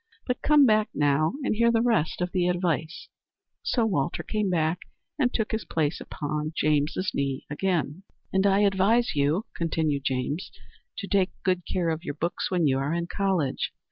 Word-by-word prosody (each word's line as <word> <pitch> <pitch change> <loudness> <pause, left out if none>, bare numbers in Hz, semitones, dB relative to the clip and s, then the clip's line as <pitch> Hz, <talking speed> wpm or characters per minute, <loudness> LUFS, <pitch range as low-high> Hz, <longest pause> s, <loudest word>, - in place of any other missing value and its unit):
But 250 -1 -2
come 300 -2 +6
back 215 -2 +3
now 145 +1 +2
and - - +1
hear 235 +2 +3
the 230 0 +2
rest 220 -10 +1
of 180 0 -1
the 180 -2 +1
advice." 175 - -1 0.5
So 235 -3 +1
Walter 170 -7 -1
came 210 -2 -1
back 165 -1 +1 0.4
and 250 -3 +2
took 220 -2 -1
his 220 -1 -2
place 155 -1 -1
again - - -9
upon 150 +1 -3
James's 155 +5 +1
knee. 135 -1 -2
"And 185 +3 -1
I 195 +1 +3
advise 205 +4 +3
you," 150 +8 +1
continued 155 -4 -1
James, 135 +6 -2 0.5
"to 200 - -5
take 195 -2 +2
good 185 -2 0
care 175 -3 0
of 160 +1 -2
your 145 - -4
books 170 +3 -2
when 180 -3 +1
you 135 -2 +2
are 145 +4 -1
in 170 0 -1
college. 190 -9 0
175 Hz, 175 wpm, -26 LUFS, 150-200 Hz, 0.5 s, come